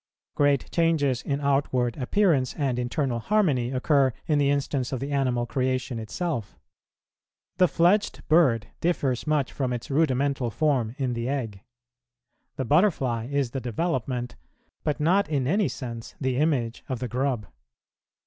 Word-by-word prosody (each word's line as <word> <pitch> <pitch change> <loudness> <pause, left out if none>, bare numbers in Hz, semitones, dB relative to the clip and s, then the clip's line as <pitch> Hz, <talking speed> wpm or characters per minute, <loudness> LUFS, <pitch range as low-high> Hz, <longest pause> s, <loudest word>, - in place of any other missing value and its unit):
Great 145 -2 +2
changes 150 -7 +2
in 140 -1 -2
outward 135 -4 +1
appearance 145 -2 +1
and 130 -4 -1
internal 125 0 -1
harmony 145 - +1
occur 135 +1 +2
in 150 -3 +2
the 140 -1 +3
instance 140 -2 -1
of 130 - -2
the 140 +3 -4
animal 130 -4 +1
creation 130 -1 -1
itself. 115 - -4 1.0
The 180 -1 +5
fledged 180 +6 +1
bird 135 -9 +4
differs 145 -7 0
much 150 -4 +1
from 130 -3 -1
its 120 +2 -4
rudimental 135 -3 +1
form 125 -3 0
in 130 -3 -1
the 115 +1 -3
egg. 115 -9 -3 0.9
The 130 - -3
butterfly 130 - +2
is 140 -4 0
the 135 - -4
development, 125 -2 -2 0.5
but 150 - -1
not 180 +6 +2
in 140 -4 0
any 195 +8 +2
sense 115 -4 -7
the 130 -2 -1
image, 130 -6 0
of 130 - -1
the 125 +1 -4
grub. 125 -3 -1
135 Hz, 145 wpm, -26 LUFS, 125-150 Hz, 1.0 s, The